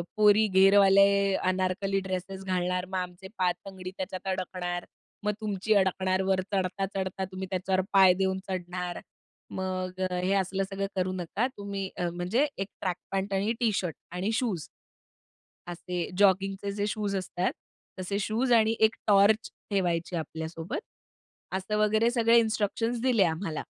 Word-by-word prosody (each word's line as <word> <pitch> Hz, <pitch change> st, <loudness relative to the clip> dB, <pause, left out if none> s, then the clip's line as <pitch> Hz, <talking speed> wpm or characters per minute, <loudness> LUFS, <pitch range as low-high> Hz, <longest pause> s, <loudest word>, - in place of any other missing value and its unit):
पोरी 215 Hz, 0 st, +5 dB
घेरवाले, 195 Hz, 0 st, +5 dB
अनारकली 185 Hz, +1 st, 0 dB
ड्रेसेस 190 Hz, 0 st, -5 dB
घालणार, 180 Hz, -1 st, 0 dB
मग 190 Hz, 0 st, -4 dB
आमचे 180 Hz, +1 st, -5 dB
पाय 180 Hz, -1 st, +2 dB
तंगडी 185 Hz, -2 st, -7 dB
त्याच्यात 185 Hz, 0 st, -5 dB
अडकणार. 180 Hz, -1 st, -3 dB, 0.4 s
मग 210 Hz, -, +2 dB
तुमची 210 Hz, 0 st, 0 dB
अडकणार. 190 Hz, -1 st, +2 dB
वर 190 Hz, -1 st, +2 dB
चढता-चढता 190 Hz, 0 st, -2 dB
तुम्ही 190 Hz, 0 st, -5 dB
त्याच्यावर 185 Hz, 0 st, +1 dB
पाय 190 Hz, -2 st, +7 dB
देऊन 190 Hz, 0 st, 0 dB
चढणार. 180 Hz, -1 st, -4 dB, 0.5 s
मग 185 Hz, 0 st, -3 dB
अ, -, -, -5 dB
हे 185 Hz, +2 st, +1 dB
असलं 195 Hz, 0 st, 0 dB
सगळं 195 Hz, 0 st, -2 dB
करू 185 Hz, 0 st, 0 dB
नका 185 Hz, +6 st, -1 dB
तुम्ही 200 Hz, -1 st, -4 dB
अ, 175 Hz, -1 st, 0 dB
म्हणजे, 180 Hz, -, 0 dB
एक 195 Hz, -, -2 dB
ट्रॅक 185 Hz, -2 st, 0 dB, 0.2 s
पॅन्ट 195 Hz, +1 st, -1 dB
आणि 200 Hz, +4 st, +1 dB
टी 230 Hz, -2 st, +2 dB
शर्ट 180 Hz, -5 st, -2 dB, 0.2 s
आणि 185 Hz, +5 st, -2 dB
शूज 220 Hz, -, -1 dB, 1.0 s
असे 175 Hz, 0 st, -4 dB
जॉगिंगचे 195 Hz, 0 st, +2 dB
जे 205 Hz, +1 st, -2 dB
शूज 205 Hz, -2 st, -2 dB
असतात. 185 Hz, -1 st, -1 dB, 0.5 s
तसे 185 Hz, +2 st, -2 dB
शूज 225 Hz, +5 st, 0 dB
आणि 225 Hz, -1 st, +4 dB
एक 220 Hz, 0 st, +4 dB
टॉर्च 210 Hz, +2 st, +4 dB, 0.2 s
ठेवायची 175 Hz, -3 st, 0 dB
आपल्यासोबत. 165 Hz, -, -4 dB, 0.8 s
असं 190 Hz, +3 st, -2 dB
वगैरे 215 Hz, +2 st, +3 dB
सगळे 235 Hz, -1 st, +4 dB
इन्स्ट्रक्शन्स 225 Hz, +1 st, 0 dB
दिले 245 Hz, -5 st, +4 dB
आम्हाला 160 Hz, -1 st, -2 dB
190 Hz, 145 wpm, -28 LUFS, 185-205 Hz, 1.0 s, पाय